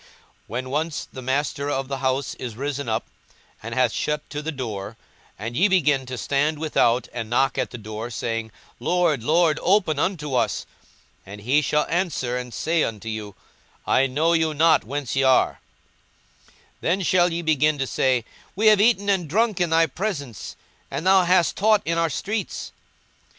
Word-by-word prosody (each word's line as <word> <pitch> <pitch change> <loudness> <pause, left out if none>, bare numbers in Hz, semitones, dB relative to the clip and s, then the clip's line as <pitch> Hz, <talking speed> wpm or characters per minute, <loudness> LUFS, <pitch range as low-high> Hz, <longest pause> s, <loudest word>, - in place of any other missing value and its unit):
42:013:025 - - -23 0.4
When 125 +3 -4
once 155 +2 -2
the 130 - -7
master 140 +2 -1
of 135 -2 -2
the 135 0 -4
house 130 0 -1
is 120 -4 -5
risen 140 0 -3
up, 110 0 -1 0.6
and - - -6
hath - - +3
shut 150 0 -2
to 150 - -4
the 160 +2 -3
door, 110 -6 -6 0.4
and 115 +4 -5
ye 185 +9 +4
begin 145 -9 +2
to 130 0 -5
stand 145 +5 0
without, 125 -6 +1
and 115 -2 -4
to - - -15
knock 135 +3 +2
at - - -1
the 120 - -8
door, 110 +1 -6
saying, 115 -1 -3 0.3
Lord, 175 -7 +1
Lord, 160 +2 +3
open 180 -6 +2
unto 150 -6 -1
us; 125 - 0 0.6
and 100 +2 -10
he 135 +8 +3
shall 150 +1 +1
answer 165 -8 -1
and 125 -1 -4
say 165 +6 0
unto 115 0 -4
you, 105 -3 -6 0.5
I 135 - +3
know 155 +6 +1
you 160 -2 +1
not 160 +2 +4
whence 140 +3 -4
ye 135 - +2
are: 130 -1 +3 0.9
42:013:026 - - -27 0.3
Then 185 +4 +1
shall 175 0 +3
ye 170 +1 -2
begin 155 -1 +2
to 135 - -1
say, 130 -2 +1 0.3
We 210 +3 0
have 210 -2 +5
eaten 210 -2 +3
and 190 -6 +1
drunk 215 +1 +1
in 175 - +2
thy 165 +1 +4
presence, 150 - -5 0.3
and 165 - -4
thou 190 -1 +5
hast 180 -1 +3
taught 215 0 +3
in 165 0 0
our 165 -1 +2
streets. 205 +6 -4
145 Hz, 185 wpm, -23 LUFS, 125-170 Hz, 0.9 s, have